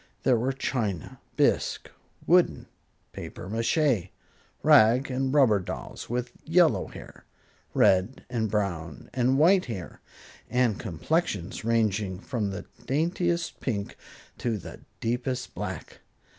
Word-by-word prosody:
There 130 Hz, -, +4 dB
were 125 Hz, +4 st, +1 dB
china, 110 Hz, -, -3 dB, 0.2 s
bisque, -, -, +1 dB, 0.4 s
wooden, 180 Hz, +1 st, +3 dB, 0.5 s
papier 90 Hz, -, -8 dB
mache, 115 Hz, -, +1 dB, 0.5 s
rag 120 Hz, +6 st, +6 dB
and 130 Hz, +1 st, 0 dB
rubber 130 Hz, -8 st, +5 dB
dolls, 90 Hz, -, -7 dB
with 120 Hz, +1 st, -2 dB
yellow 165 Hz, -1 st, +3 dB
hair, -, -, -12 dB, 0.5 s
red 95 Hz, +7 st, +3 dB
and 115 Hz, -3 st, -1 dB
brown 85 Hz, -, -3 dB
and 130 Hz, +1 st, +2 dB
white 180 Hz, +5 st, +5 dB
hair, 95 Hz, -8 st, -7 dB, 0.5 s
and 125 Hz, -4 st, +2 dB
complexions 100 Hz, -, -2 dB
ranging 110 Hz, -4 st, +1 dB
from 110 Hz, -3 st, -2 dB
the 95 Hz, -, -6 dB, 0.2 s
daintiest 170 Hz, +3 st, 0 dB
pink 100 Hz, -6 st, -3 dB, 0.4 s
to 115 Hz, -3 st, -1 dB
the 95 Hz, -, -9 dB, 0.2 s
deepest 125 Hz, +2 st, -2 dB
black. -, -, -6 dB
120 Hz, 115 wpm, -27 LUFS, 100-135 Hz, 0.5 s, rag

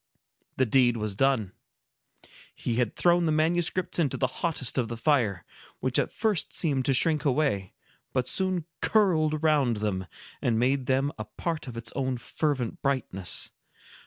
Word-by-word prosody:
The 130 Hz, -, +3 dB
deed 120 Hz, 0 st, +3 dB
was 105 Hz, -2 st, -2 dB
done. 115 Hz, -3 st, +1 dB, 1.0 s
He 120 Hz, -2 st, -2 dB
had 120 Hz, -4 st, 0 dB
thrown 175 Hz, -1 st, +3 dB
the -, -, +2 dB
manuscripts 170 Hz, +4 st, +1 dB
into 150 Hz, -6 st, +1 dB
the 130 Hz, -, +1 dB, 0.2 s
hottest 145 Hz, -7 st, 0 dB
of 120 Hz, -, 0 dB
the 115 Hz, +1 st, -5 dB
fire, 115 Hz, -, +1 dB, 0.3 s
which 130 Hz, -1 st, 0 dB
at -, -, 0 dB
first 210 Hz, -6 st, -1 dB
seemed 140 Hz, -6 st, +1 dB
to 135 Hz, -, +3 dB
shrink 155 Hz, +2 st, +2 dB
away, 125 Hz, -, 0 dB, 0.4 s
but 130 Hz, -1 st, 0 dB
soon 185 Hz, -4 st, 0 dB, 0.2 s
curled 165 Hz, -8 st, +3 dB
around 150 Hz, -7 st, +2 dB
them, 95 Hz, -3 st, -2 dB, 0.3 s
and 115 Hz, -2 st, +1 dB
made 130 Hz, +2 st, +1 dB
them 135 Hz, +2 st, +2 dB
a 110 Hz, -, -4 dB
part 155 Hz, +9 st, -4 dB
of 120 Hz, -2 st, -7 dB
its 115 Hz, 0 st, -2 dB
own 130 Hz, -2 st, -1 dB
fervent 130 Hz, 0 st, -2 dB
brightness. 120 Hz, -10 st, -1 dB
135 Hz, 160 wpm, -27 LUFS, 115-155 Hz, 1.0 s, The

